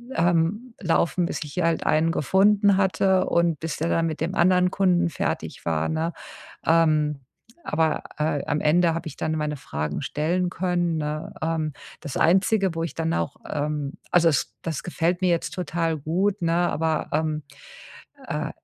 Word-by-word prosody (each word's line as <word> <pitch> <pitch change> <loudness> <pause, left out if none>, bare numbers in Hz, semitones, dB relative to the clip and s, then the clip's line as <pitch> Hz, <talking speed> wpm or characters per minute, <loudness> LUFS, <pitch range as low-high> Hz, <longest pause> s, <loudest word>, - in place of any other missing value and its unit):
ähm, 175 +8 +1
laufen, 175 0 +1
bis - - -3
ich 145 - -10
hier 180 - 0
halt 165 -1 0
einen 160 +2 +3
gefunden 200 +5 +3
hatte 190 0 +2
und 170 -2 +2
bis 160 -1 -3
der 165 - -1
dann 165 - +2
mit 160 -1 -4
dem 170 +4 -2
anderen 180 +1 +4
Kunden 180 -3 +2
fertig 155 - -3
war, 80 -1 0
ne? 160 +2 -1 0.5
Ähm. 155 -3 +3 0.4
Aber, 160 0 0
äh, 150 -2 0
am 145 - 0
Ende 165 +3 +3
habe 165 0 -4
ich 150 - -7
dann 155 - -2
meine 150 -1 -2
Fragen 75 - -4
stellen 170 +6 0
können, 175 -2 0
ne, 150 0 -3
ähm. 160 -1 -1 0.3
Das 145 -5 -5
Einzige, 190 +1 +3
wo 165 - -1
ich 165 - -4
dann 165 0 -1
auch 145 - -2
ähm, 150 -1 -2 0.2
also, 170 -1 +5
das 145 - 0
das 160 -4 -3
gefällt 175 +1 -1
mir 185 - +3
jetzt 170 -1 0
total 165 -3 -1
gut, 180 +8 0
ne, 165 -1 +1 0.2
aber, 160 0 -1
ähm, 155 0 0 0.9
äh, - - -2
165 Hz, 170 wpm, -24 LUFS, 155-180 Hz, 0.9 s, also